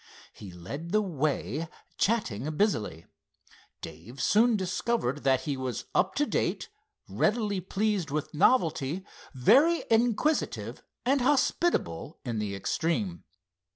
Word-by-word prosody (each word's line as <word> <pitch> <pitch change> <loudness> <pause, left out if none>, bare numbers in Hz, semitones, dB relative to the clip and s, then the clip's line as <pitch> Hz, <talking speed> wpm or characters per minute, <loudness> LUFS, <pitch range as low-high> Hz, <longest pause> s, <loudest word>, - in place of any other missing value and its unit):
He 100 -3 -10
led 140 - -7
the 215 - +4
way, 155 -2 -2 0.3
chatting 155 - 0
busily. 105 - 0 0.8
Dave 80 - -10
soon 225 - +4
discovered 185 - -1
that 130 -1 +3
he 140 +1 -2
was 130 -2 -4
up 190 - +2
to 295 - +2
date, - - -1 0.4
readily 210 -3 0
pleased 195 -2 -1
with 150 +1 -3
novelty, 160 - +2 0.3
very 275 - +5
inquisitive 240 +7 +1 0.2
and 270 +2 +3
hospitable 265 - +1
in 115 -3 -2
the 100 -2 -3
extreme. 105 - -2
165 Hz, 115 wpm, -28 LUFS, -, 0.8 s, very